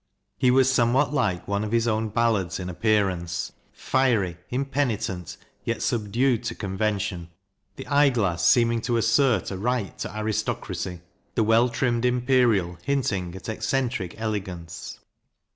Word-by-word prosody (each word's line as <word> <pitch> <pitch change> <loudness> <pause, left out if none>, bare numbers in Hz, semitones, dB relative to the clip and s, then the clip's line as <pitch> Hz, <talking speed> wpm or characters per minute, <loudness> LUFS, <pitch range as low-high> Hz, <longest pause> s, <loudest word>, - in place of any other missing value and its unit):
He 125 +5 +2
was 130 +1 +5
somewhat 130 +4 +2
like 90 -11 0
one 100 +1 -1
of 105 - -4
his 115 0 +2
own 110 0 0
ballads 105 -6 0
in 90 0 -4
ap 90 - -13
pearance; 95 -6 0 0.2
fiery, 115 -10 +1
impenitent, 125 - -2 0.3
yet - - -2
subdued 120 +2 +1
to - - -3
convention 100 -3 -2 0.5
the 135 - -8
eye 145 0 +4
glass 95 -10 0
seeming 115 +3 +4
to 120 0 0
assert 115 -2 +2
a 95 - -4
right 120 -1 -1
to 110 - -5
aristocracy, 105 -4 -3 0.3
the 115 - +3
well 115 +3 +4
trimmed 120 -1 0
imperial 125 -8 +2
hinting 100 -11 -1
at 95 - -9
eccentric 110 -3 -2
ele 110 -2 -1
gance. 85 -4 -8
110 Hz, 145 wpm, -25 LUFS, 95-125 Hz, 0.5 s, was